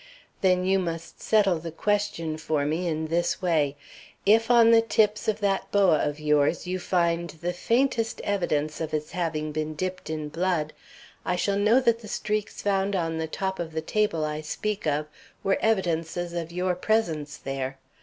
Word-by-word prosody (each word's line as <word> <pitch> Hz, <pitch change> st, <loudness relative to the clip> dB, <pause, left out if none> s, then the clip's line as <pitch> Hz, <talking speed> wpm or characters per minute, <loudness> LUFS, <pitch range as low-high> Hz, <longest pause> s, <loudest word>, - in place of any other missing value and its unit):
"Then 185 Hz, -1 st, +3 dB
you 190 Hz, +1 st, +3 dB
must 170 Hz, -2 st, -5 dB
settle 200 Hz, -6 st, +3 dB
the 165 Hz, +1 st, -6 dB
question 205 Hz, -3 st, -1 dB
for 155 Hz, -2 st, -1 dB
me 160 Hz, +4 st, -1 dB
in 160 Hz, -1 st, -1 dB
this 170 Hz, +1 st, 0 dB
way. 155 Hz, -6 st, +1 dB, 0.5 s
If 225 Hz, +3 st, +4 dB
on 235 Hz, -1 st, +7 dB
the 230 Hz, 0 st, +7 dB
tips 215 Hz, -2 st, +1 dB
of 215 Hz, 0 st, 0 dB
that 195 Hz, -1 st, 0 dB
boa 195 Hz, -6 st, +4 dB
of 145 Hz, 0 st, -1 dB
yours 150 Hz, +2 st, +2 dB
you 185 Hz, +1 st, -2 dB
find 170 Hz, -1 st, 0 dB
the 170 Hz, +2 st, -4 dB
faintest 230 Hz, +4 st, +1 dB
evidence 155 Hz, -7 st, -1 dB
of 155 Hz, -1 st, -2 dB
its 150 Hz, 0 st, -4 dB
having 155 Hz, -4 st, -2 dB
been 155 Hz, 0 st, -3 dB
dipped 185 Hz, +2 st, -4 dB
in 155 Hz, -1 st, -3 dB
blood, 165 Hz, -2 st, -1 dB, 0.5 s
I 180 Hz, -, 0 dB
shall 200 Hz, +3 st, 0 dB
know 215 Hz, +5 st, +5 dB
that 235 Hz, -2 st, +2 dB
the 220 Hz, -, -11 dB
streaks 210 Hz, 0 st, -3 dB
found 195 Hz, 0 st, +1 dB
on 165 Hz, -3 st, -1 dB
the 160 Hz, -, -2 dB
top 190 Hz, +4 st, -3 dB
of 165 Hz, -2 st, -4 dB
the 160 Hz, -, -1 dB
table 165 Hz, -3 st, 0 dB
I 150 Hz, 0 st, -3 dB
speak 205 Hz, +5 st, -3 dB
of 150 Hz, 0 st, +1 dB, 0.4 s
were 195 Hz, -, +2 dB
evidences 175 Hz, -4 st, 0 dB
of 170 Hz, -1 st, -4 dB
your 180 Hz, +1 st, 0 dB
presence 165 Hz, -7 st, 0 dB
there. 135 Hz, 0 st, -4 dB
175 Hz, 180 wpm, -26 LUFS, 155-200 Hz, 0.5 s, on